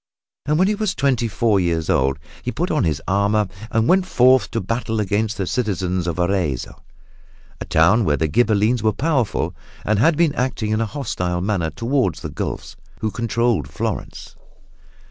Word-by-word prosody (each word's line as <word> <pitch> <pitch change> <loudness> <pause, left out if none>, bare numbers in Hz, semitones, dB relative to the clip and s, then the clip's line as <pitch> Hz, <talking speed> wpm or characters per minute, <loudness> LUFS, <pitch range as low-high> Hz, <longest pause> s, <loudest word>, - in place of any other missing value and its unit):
And 150 +1 +2
when 185 +3 +4
he 210 - +2
was 210 -3 -1
twenty 130 -4 +1
four 105 -1 +1
years 85 -3 0
old 65 +1 +2 0.2
he - - -3
put - - -2
on - - +1
his 75 -4 -1
armor 100 +2 +2 0.2
and 115 -1 +1
went 185 0 +3
forth 130 -2 +4
to 115 - -2
battle 110 +2 -2
against 105 +2 0
the 95 - -1
citizens 95 -5 -1
of 85 - -2
Arezzo, 85 -7 -1 0.8
a - - -5
town 90 +9 +4
where 75 -6 +1
the 80 - 0
Ghibellines 110 +4 +2
were 110 0 +2
powerful 135 -3 0 0.3
and 105 -1 +1
had 155 +6 +4
been 165 -4 +3
acting 125 -5 -2
in 110 +1 +1
a 115 - 0
hostile 90 -10 -3
manner 95 -4 0
toward 120 - 0
the - - -7
Guelfs, - - -5 0.3
who 110 - -1
controlled 115 - 0
Florence. 75 - -5
110 Hz, 175 wpm, -21 LUFS, 90-125 Hz, 0.8 s, when